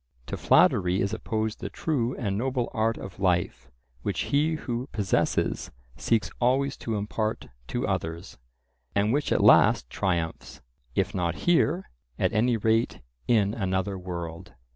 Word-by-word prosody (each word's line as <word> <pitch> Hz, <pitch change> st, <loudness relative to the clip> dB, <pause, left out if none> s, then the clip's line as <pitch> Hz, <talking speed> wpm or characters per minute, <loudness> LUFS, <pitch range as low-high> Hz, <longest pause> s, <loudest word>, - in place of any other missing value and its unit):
To -, -, -4 dB
flattery 90 Hz, +1 st, +4 dB
is 100 Hz, +2 st, 0 dB
opposed 110 Hz, 0 st, -2 dB
the -, -, -5 dB
true 130 Hz, -6 st, -1 dB
and 100 Hz, -6 st, -2 dB
noble 125 Hz, +2 st, -1 dB
art 110 Hz, +1 st, +1 dB
of 95 Hz, -1 st, -9 dB
life 90 Hz, -8 st, 0 dB, 0.3 s
which -, -, -2 dB
he 155 Hz, +3 st, +1 dB
who 125 Hz, -2 st, -4 dB
possesses 100 Hz, -3 st, 0 dB, 0.3 s
seeks 115 Hz, -2 st, 0 dB
always 135 Hz, +3 st, +2 dB
to 115 Hz, -, -3 dB
impart 110 Hz, -, -2 dB, 0.2 s
to -, -, -2 dB
others, 85 Hz, +3 st, -4 dB, 0.6 s
and 105 Hz, +3 st, +2 dB
which 145 Hz, +1 st, 0 dB
at -, -, +2 dB
last -, -, +5 dB
triumphs, 85 Hz, -3 st, -2 dB, 0.4 s
if 95 Hz, 0 st, 0 dB
not 85 Hz, -3 st, -1 dB
here, 175 Hz, +1 st, +2 dB, 0.3 s
at -, -, +1 dB
any 115 Hz, +2 st, +2 dB
rate 110 Hz, +2 st, +1 dB, 0.3 s
in 105 Hz, -4 st, +3 dB
another 95 Hz, -2 st, -1 dB
world. 85 Hz, -2 st, -6 dB
110 Hz, 140 wpm, -27 LUFS, 95-120 Hz, 0.6 s, last